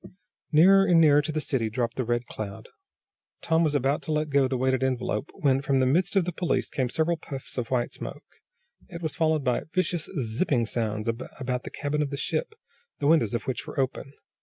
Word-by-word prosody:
Nearer 195 +5 +6
and 170 -2 +5
nearer 150 -2 +6
to 155 - -3
the 155 - -1
city 130 -7 -1
dropped 120 +1 -2
the 130 - -1
Red 120 +1 -1
Cloud. 100 -4 -7 0.7
Tom 165 0 +2
was 150 -2 +1
about 140 +1 +1
to - - -5
let 150 -1 0
go 140 -1 +4
the 130 0 -1
weighted 130 +1 +1
envelope, 130 -2 -1
when, 135 -7 +2
from 135 -1 +1
the 130 - +3
midst 175 +8 +1
of 190 -3 +3
the 180 - -2
police 175 0 -1
came 130 -4 -1
several 160 +5 +1
puffs 135 -3 -8
of 120 -3 -3
white 125 -2 0
smoke. - - -7 0.7
It 170 0 -8
was 160 - -3
followed 160 -3 +1
by 125 -1 +1
vicious, 175 -2 0
zipping 120 +1 0
sounds 110 -1 -2
about 125 +2 -3
the - - -5
cabin 150 0 -2
of 145 - -1
the 140 - -4
ship, 440 - -2 0.4
the 145 - -3
windows 145 -8 +3
of 120 - -2
which 130 -2 -4
were - - -5
open. 135 +1 -2
140 Hz, 210 wpm, -26 LUFS, 125-160 Hz, 0.7 s, Nearer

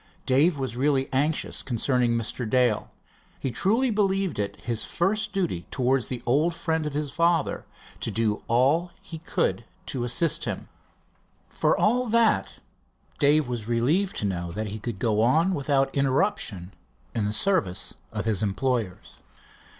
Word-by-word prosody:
Dave 145 +5 +3
was 130 -3 -3
really 135 +1 +1
anxious 145 +4 0
concerning 125 -1 +1
Mr. 115 0 -3
Dale. 125 -3 +2 0.5
He 135 - -2
truly 225 - +2
believed 195 - 0
it 100 -1 -3
his 115 -2 -2
first 210 +4 0
duty 175 - -2
towards 130 -1 +1
the 125 -2 -5
old 150 +8 +2
friend 160 -2 -1
of 145 - -5
his 150 -1 -2
father 170 +2 +1 0.3
to - - -3
do 110 -2 0
all 140 +9 +3
he 170 -5 -8
could 165 - -1 0.2
to 125 - -3
assist 150 +7 +1
him. - - -5 0.8
For - - +1
all 245 +4 +2
that, 230 0 +2 0.7
Dave 145 -1 +4
was 120 -3 -4
relieved 140 +12 +1
to - - -2
know 85 -3 -2
that 110 +2 -3
he 105 +2 -6
could 115 -1 -5
go 110 +1 +1
on 160 +11 +3
without 135 -3 +1
interruption 135 - 0 0.4
in 105 -3 0
service 110 - +1 0.2
of - - -4
his 110 -4 +1
employers. 110 -1 -2
135 Hz, 150 wpm, -26 LUFS, 115-165 Hz, 0.8 s, Dave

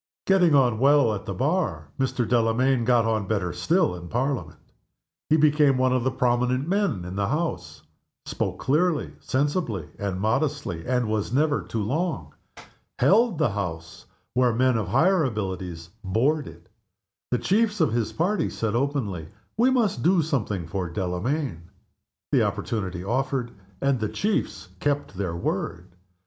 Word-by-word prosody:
Getting 180 -5 +4
on 125 -5 +3
well 140 -3 +4
at 105 - -5
the 100 - -2
Bar, 105 - -1
Mr. 130 -3 0
Delamayn 120 +1 +2
got 120 -2 +3
on 110 -3 0
better 95 -5 -1
still 170 - +1
in 85 -1 -8
Parliament. 130 - -2 0.7
He 155 - +5
became 150 -3 +4
one 130 0 +2
of 130 -2 +1
the 130 - +2
prominent 125 +1 +1
men 185 - 0
in 90 +1 -6
the 100 0 0
House. 160 +6 -3 0.4
Spoke - - -3
clearly, 155 +3 +1
sensibly, 135 - -1
and 100 -2 -2
modestly, 110 - -1
and 125 -2 +1
was 110 -1 -1
never 145 +2 +2
too 110 -2 -3
long. 140 - -2 0.6
Held 205 - +4
the 150 -7 +2
House, 80 -5 -5 0.3
where 125 0 +3
men 130 +1 +3
of 110 -4 -1
higher 160 - +3
abilities 95 - -4
"bored" 135 +10 +1
it. - - -13 0.6
The 125 - +1
chiefs 210 - +1
of 155 -8 +2
his 115 -2 0
party 190 +6 0
said 110 -2 -2
openly, 120 - -1 0.3
"We 240 +4 +4
must 230 - +1
do 175 +2 +3
something 110 - -2
for 90 +1 -3
Delamayn," 90 - -3 0.6
The - - +4
opportunity 95 -5 -2
offered, 130 +2 -1 0.3
and 135 -2 +1
the 110 -1 -1
chiefs 210 0 -2
kept 145 -4 -1
their 90 -3 -3
word. 85 +1 -3
125 Hz, 150 wpm, -25 LUFS, 100-150 Hz, 0.7 s, He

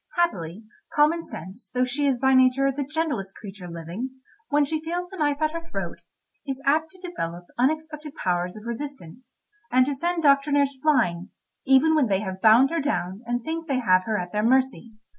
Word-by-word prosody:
Happily 200 - -1 0.3
common 305 +3 +4
sense, 190 - -8
though 250 - +3
she 275 +3 0
is 260 -3 +1
by 265 +1 +3
nature 260 +1 +4
the 280 +2 -3
gentlest 285 -10 -3
creature 195 -4 -9
living, 170 +9 -5 0.4
when 295 -1 +3
she 310 +2 -2
feels 350 +2 -3
the 385 - -8
knife 290 -2 +1
at 310 - +2
her 335 +1 -5
throat, 330 - -6 0.4
is 270 -2 -4
apt 310 +3 +2
to 365 +2 -10
develop 175 - -5
unexpected 305 +2 -1
powers 180 - -1
of 215 +1 -11
resistance, 255 - -7 0.4
and 255 +1 +5
to 285 - -1
send 340 +4 -1
doctrinaires 280 -1 +3
flying, 215 - +2 0.4
even 270 +4 +5
when 300 -5 +3
they 195 -1 +1
have 190 -2 -5
bound 230 +6 +6
her 335 -1 0
down 200 -9 -2
and 240 0 -1
think 325 +2 -4
they 275 -3 0
have 185 -7 +3
her 220 -1 0
at 180 -1 -4
their 210 - 0
mercy. 255 -1 +1
265 Hz, 190 wpm, -25 LUFS, 210-305 Hz, 0.4 s, bound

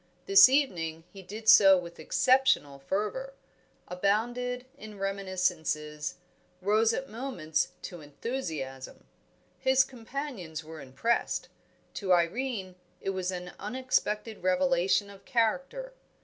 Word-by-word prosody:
This 195 +4 +9
evening 170 - 0
he 195 - -10
did 215 +4 -9
so 195 -3 +9
with 170 -2 -7
exceptional 255 - +2
fervour, 210 - -3 0.5
abounded 240 +7 -1
in 215 -1 -11
reminiscences, 180 -6 -2 0.4
rose 215 +4 +3
at 270 +4 -3
moments 225 - -2 0.2
to 175 -3 -7
enthusiasm. 145 - -6 0.5
His 265 0 +4
companions 235 - -6
were 160 0 -10
impressed; 140 - -1 0.4
to 190 -3 +1
Irene 185 +2 0 0.2
it 195 - -2
was 185 -1 -2
an 180 -1 -5
unexpected 220 -1 -1
revelation 185 +2 +2
of 195 - -15
character. 270 - -1
195 Hz, 105 wpm, -29 LUFS, 175-245 Hz, 0.5 s, This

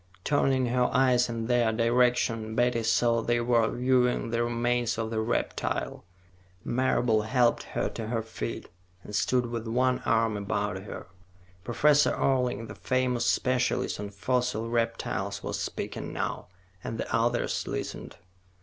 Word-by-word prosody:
Turning 135 -3 +2
her 125 +1 +1
eyes 125 -1 +3
in 115 -1 -3
their 120 -1 +2
direction, 115 -1 +1
Betty 120 0 +2
saw 115 +1 +2
they 120 +1 +1
were 120 -1 +2
viewing 125 -2 +1
the 115 0 +1
remains 120 0 0
of 115 0 -3
the 110 - -1
reptile. 110 +2 -2 0.6
Marable 120 -3 +1
helped 120 +2 +2 0.2
her - - +1
to 110 - -6
her 115 -1 -1
feet, 110 - -5 0.4
and 105 - -10
stood 125 +2 +2
with 115 -1 -5
one 125 +2 +1
arm 115 -1 +1
about 100 -1 -2
her. - - -7 0.6
Professor 145 +6 +3
Orling, 125 -3 0
the - - -8
famous 130 -2 0
specialist 125 -4 +1
on 105 0 -4
fossil 115 +2 -1
reptiles, 115 -1 -2
was - - -3
speaking - - -4
now, - - -3 0.4
and 115 - -4
the - - -2
others 115 +1 0
listened. - - -5
120 Hz, 140 wpm, -28 LUFS, 115-125 Hz, 0.6 s, eyes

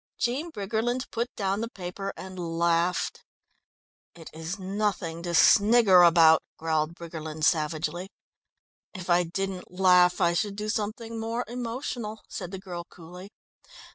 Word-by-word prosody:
Jean 270 +8 -1
Briggerland 225 +3 -2
put 235 +2 -2
down 195 0 -1
the 230 - -3
paper 195 0 -6
and 185 -1 -8 0.2
laughed. 170 +1 +1 0.9
"It 165 -2 -12
is 160 +4 -5
nothing 190 -4 -2
to 170 0 -2
snigger 205 -1 +6
about," 165 -2 +6 0.2
growled 160 0 -1
Briggerland 160 -2 -7
savagely. 160 +3 0 0.9
"If 180 -2 -4
I 175 +1 +4
didn't 190 +2 -4
laugh 180 -1 +4
I 170 -2 +3
should 200 +3 -1
do 210 +1 -4
something 225 +1 -3
more 230 +2 -3
emotional," 235 -2 -5
said 175 - -6
the 190 - -6
girl 180 -3 -7
coolly. 180 +3 -12
185 Hz, 135 wpm, -27 LUFS, 170-215 Hz, 0.9 s, snigger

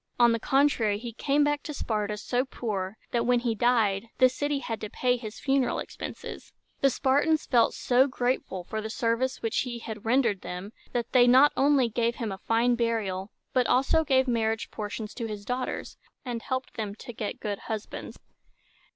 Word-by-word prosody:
On 240 -1 +6
the 230 - +1
contrary, 260 -6 +2
he 235 +1 -7
came 280 +5 +2
back 290 0 +1
to 300 - -6
Sparta 210 -4 -2
so 245 +4 0
poor, 210 -6 -4
that, 235 -1 +1
when 245 0 +3
he 240 -2 0
died, 220 -3 +2
the 255 0 +6
city 290 +3 -1
had 230 -5 -4
to 215 - -4
pay 250 +2 +1
his 225 -3 -7
funeral 270 -2 +1
expenses. - - -7 0.3
The 275 - +4
Spartans 285 +5 +2
felt 240 -3 +3
so 255 +2 +3
grateful 245 -8 -2
for 215 +4 -4
the 220 - -5
services 230 +3 -1
which 225 - 0
he 245 -2 -2
had 220 -3 -7
rendered 230 -4 +2
them, 180 +4 -6 0.2
that 240 -1 -2
they 245 -2 +6
not 265 +4 +7
only 275 -2 +4
gave 235 +1 0
him 225 -4 -3
a 190 - -6
fine 230 +3 +2
burial, 220 -5 -1 0.2
but 250 -2 +3
also 270 +6 +3
gave 265 -3 +3
marriage 225 -2 0
portions 210 0 -5
to 230 -3 -4
his 210 -2 -6
daughters, 250 +2 -3 0.3
and 240 -2 -3
helped 260 +1 -4
them 210 -2 -3
to 240 - -9
get 215 -1 -4
good 205 -2 -3
husbands. 215 -2 -6
235 Hz, 185 wpm, -27 LUFS, 215-260 Hz, 0.3 s, not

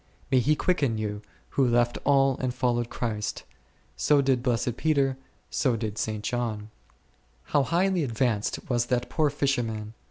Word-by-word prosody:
May 130 - +5
he 150 +5 +3
quicken 145 -10 +1
you, 105 -1 -3 0.3
who 135 -2 +2
left 120 0 +2
all 135 -1 +4
and 130 -1 -1
followed 120 -2 0
Christ! 105 -3 -3 0.5
so 150 -1 +3
did 135 -3 +2
blessed 120 -1 0
Peter, 140 -3 +1 0.4
so 130 -4 +1
did 110 -2 -4
St. 110 -1 -2
John. 110 -3 -3 0.7
How 145 - +2
highly 175 +4 +1
advanced 115 -4 -1
was 120 -3 0
that 125 -1 -1
poor 155 -2 +2
fisherman 120 -7 -1
125 Hz, 150 wpm, -27 LUFS, 115-140 Hz, 0.7 s, May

